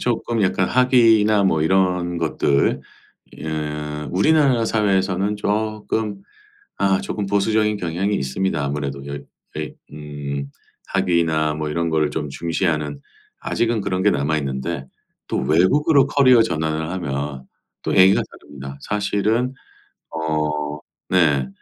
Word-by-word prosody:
조금 115 -2 -1
약간 95 0 +1
학위나 115 -5 +4
뭐 80 -4 +2
이런 90 -1 +1
것들 70 -4 +1 0.6
예 80 - -6 0.6
우리나라 135 - +3
사회에서는 100 -2 +1
쪼끔 105 -1 -2 0.6
아 95 -1 +2
조끔 105 -2 -4
보수적인 105 +2 +1
경향이 95 +2 -1
있습니다. 70 +4 -1
아무래도 70 -1 -3
여 70 0 -5 0.4
왜 - - -5 0.2
음 70 -2 -6 0.4
학위나 85 -5 +1
뭐 75 0 -3
이런 85 +2 -1
거를 80 -2 +1
좀 75 -1 -3
중시하는 75 -2 -2 0.4
아직은 115 -2 0
그런 95 -1 -1
게 105 - +4
남아있는데 70 0 -2 0.4
또 - - -1
외국으로 135 - +3
커리어 130 -5 +5
전환을 80 -4 -2
하면 70 -6 -4 0.4
또 - - -1
얘기가 95 +1 +6
다릅니다. 70 -1 -10
사실은 105 +5 0 0.6
어 75 -2 -2 0.3
네. 75 -8 +3
90 Hz, 265 characters per minute, -21 LUFS, 75-105 Hz, 0.6 s, 얘기가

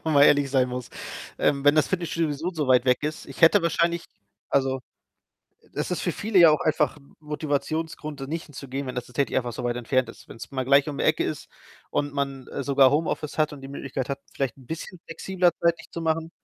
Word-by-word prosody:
Wenn 160 - +1
man 140 - +7
ehrlich 145 -2 +4
sein 130 -2 +3
muss. 125 0 -5 0.5
Ähm, 140 -1 +1
wenn 145 +1 +6
das 155 - +4
Fitnessstudio 170 -3 0
sowieso 160 +5 -3
so 155 -5 -2
weit 125 0 +5
weg 125 +2 +2
ist 150 +1 -4
ich - - -10
hätte 170 +4 +7
wahrscheinlich 170 +1 +1 0.4
also, 135 -1 +1 0.8
e - - -25
es - - -2
ist - - -1
für - - -1
viele 210 -2 +1
ja 170 -3 +9
auch 150 - +2
einfach 150 -1 +1
'n 140 - -21
Motivationsgrund, 150 0 -3
da 135 - -4
nicht 160 +3 -4
hinzugehen, 140 -1 -6
wenn 130 - -4
das 125 -1 -4
tatsächlich 140 +3 -1
einfach 125 -2 0
so 120 - -5
weit 120 0 0
entfernt 125 +2 +1
ist. - - -13
Wenn's 115 +1 -9
mal 130 -1 -1
gleich 140 +3 +4
um 145 - -5
die - - 0
Ecke - - +3
ist - - -4 0.4
und 145 0 -1
man, 135 -2 -3
äh, - - -4
sogar 135 -1 +5
Homeoffice 150 0 -1
hat 155 -1 +2
und 145 - -9
die 135 - -9
Möglichkeit 135 -1 -4
hat, 140 0 -3
vielleicht 135 -3 -2
'n 130 - -17
bisschen 165 +5 -6
flexibler 180 +2 +1
zeitlich 170 0 +1
zu 170 - -5
machen 160 0 0
145 Hz, 230 wpm, -25 LUFS, 135-160 Hz, 0.8 s, ja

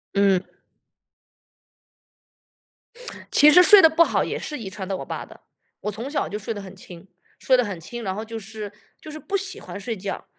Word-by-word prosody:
嗯。 195 -2 +3 2.9
其 300 +1 +7
实 360 +2 +8
睡 405 +1 +9
得 325 - +7
不 335 +1 +4
好 - - 0
也 - - -4
是 300 - -4
遗 195 -4 -6
传 190 -1 -7
到 195 - -2
我 - - -7
爸 - - -6
的， - - -17 0.4
我 210 - -3
从 230 +7 -5
小 285 -2 -2
就 210 - -4
睡 225 +2 -5
得 205 - -7
很 195 0 -11
轻。 180 0 -13 0.3
睡 260 -1 +2
得 250 - +1
很 195 -4 -5
轻， 240 +8 -7
然 190 -3 -4
后 215 - -5
就 225 0 -7
是， 210 0 -7 0.3
就 310 - -10
是 310 - -8
不 400 +4 -5
喜 390 0 -2
欢 - - -9
睡 220 +3 -5
觉。 195 +1 -6
220 Hz, 220 characters per minute, -23 LUFS, 195-295 Hz, 2.9 s, 睡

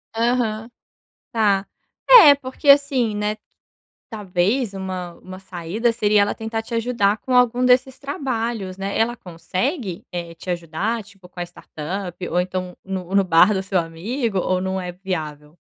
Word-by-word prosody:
Aham. 230 -1 0 0.6
Tá. 200 -3 +2 0.4
Eh, 430 -13 +10
porque 275 +1 -4
assim, 275 -5 +4
né, 210 +1 -1 0.7
talvez 205 +3 -1
uma 185 -2 -5
uma 185 +1 -11
saída 190 +5 -2
seria 210 -2 +3
ela 205 - 0
tentar 225 0 -4
te 235 +1 -7
ajudar 225 -3 +1
com 255 - -3
algum 250 0 +4
desses 255 +1 +3
trabalhos, 235 -8 -3
né? 195 +1 -3
Ela 235 +2 +1
consegue, 185 - -4
eh, 170 -1 -5
te 165 - -13
ajudar 180 +6 -2
tipo 195 -2 -17
com 180 - -10
a - - 0
startup 175 +1 -6
ou 175 - +1
então, 180 0 -4
no 190 -1 -5
no 195 -1 +4
bar 180 +3 +5
do 190 -2 -1
seu 190 -1 0
amigo? 195 +7 -3
Ou 185 0 0
não 190 0 -2
é 180 -1 -5
viável? 155 -5 -6
200 Hz, 155 wpm, -21 LUFS, 180-235 Hz, 0.7 s, Eh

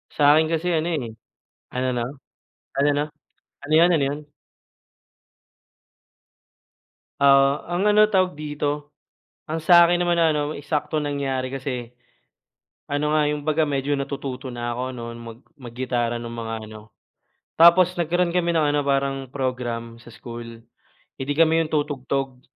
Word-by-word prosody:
Sakin 150 +2 +5
kasi 165 +2 -1
ano 160 +1 0
eh 140 -9 -2 0.6
ano 130 +1 -1
ano? 120 -1 -1 0.8
Ano 140 +1 +3
ano? 145 +1 +1 0.6
Ano 150 +2 -3
'yun, 165 +2 +7
ano 150 -4 +2
'yun? 145 +2 -4 2.9
Oo 140 +1 +4
ang 175 +2 -2
ano 210 +1 +6
tawag 185 -6 +1
dito 145 0 -4 0.5
ang 160 0 -4
sakin 175 +1 +6
naman 175 -1 +1
na 165 -1 +4
ano 150 0 -1
eksaktong 150 0 -2
nangyari 135 -2 -2
kasi, 130 -3 -5 1.0
ano 150 +1 0
nga 155 - +3
yung 150 0 -3
baga 155 +1 +2
medyo 140 0 -1
natututo 140 -1 -4
na 120 -1 -4
ako 125 - -4
ano 125 -2 -7
mag 115 -1 -10
mag 125 -6 -11
gitara 120 -2 -1
ng 120 - -7 0.2
mga 115 0 -5
ano. 110 0 -12 0.7
Tapos 170 +2 +7
nagkaroon 175 +1 +1
kami 170 -1 0
ng 160 - +3
ano 145 - +1
parang 135 -1 -1
program 120 -3 -4
sa 120 - -18
school 115 -1 -10 0.5
eh 135 - -5
di 145 - -3
kami 165 +2 +3
'yong 155 - -8
tutugtog 135 -3 -2
145 Hz, 145 wpm, -23 LUFS, 125-155 Hz, 2.9 s, yun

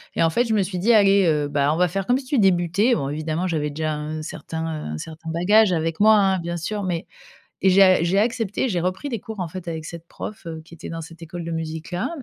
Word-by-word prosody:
Et - - +2
en 165 - +3
fait 240 +8 +2
je 220 -2 0
me 200 - +3
suis 185 -1 -4
dit: 215 +7 +3
«Allez 200 -2 +5
heu, 150 -2 +1
bah, 145 0 +1
on 155 - 0
va 180 0 +3
faire 195 +2 -3
comme 245 - +3
si 270 - -7
tu 260 0 +1
débutais». 195 +4 +3
Bon 140 -4 -2
évidemment 155 +4 -2
j'avais 155 -4 -1
déjà 155 +1 -2
un 155 +1 -5
certain 160 +1 -5
un 155 - -4
certain 160 - -8
bagage 195 +5 +4
avec 165 0 -1
moi 220 +1 +7
hein 195 -2 +3
bien 170 0 -4
sûr 205 +5 -3
mais 175 -3 -2 0.6
et 190 - +4
j'ai 195 +2 +6
a 185 -3 +5
j'ai 190 +4 +2
accepté, 225 +1 0
j'ai 185 - -1
repris 185 +10 -2
des 235 -5 -3
cours 220 0 -8
en 175 - -2
fait 185 +2 -8
avec 160 -2 -4
cette 170 +1 -9
prof, 210 +1 -8
heu, 160 -1 -6
qui 170 - -14
était 165 - -9
dans 165 0 -5
cette 165 +1 -11
école 170 +2 -7
de 165 - -5
musique-là 165 +2 -3
175 Hz, 265 wpm, -23 LUFS, 160-195 Hz, 0.6 s, moi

